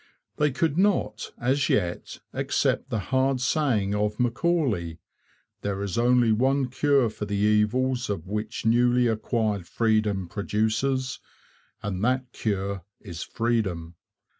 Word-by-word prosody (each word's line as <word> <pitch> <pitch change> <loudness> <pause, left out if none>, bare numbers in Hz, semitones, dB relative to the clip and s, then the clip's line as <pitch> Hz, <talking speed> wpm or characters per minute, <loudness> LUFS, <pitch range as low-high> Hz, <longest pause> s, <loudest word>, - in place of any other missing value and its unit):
They 150 0 +3
could 155 +4 0
not, 175 - +1
as 135 +3 +1
yet, 90 -3 -1
accept - - 0
the - - -1 0.2
hard 130 0 +2
saying 125 -7 +1
of 105 0 -1
Macaulay: 120 - 0 0.6
'There 100 -1 -2
is 100 -3 -3
only 120 -1 +4
one 130 +4 +2
cure 140 -1 +3
for 105 -1 -5
the 100 0 -3
evils 110 +5 +2
which 105 +5 -4
newly 120 +2 +4
acquired 110 -4 -1
freedom 110 -5 +1
produces, 110 +7 -1 0.6
and 100 -1 -3
that 130 +1 0
cure 100 -4 -2 0.2
is 85 -6 -8
freedom.' 100 -8 -1
115 Hz, 120 wpm, -26 LUFS, 105-130 Hz, 0.6 s, only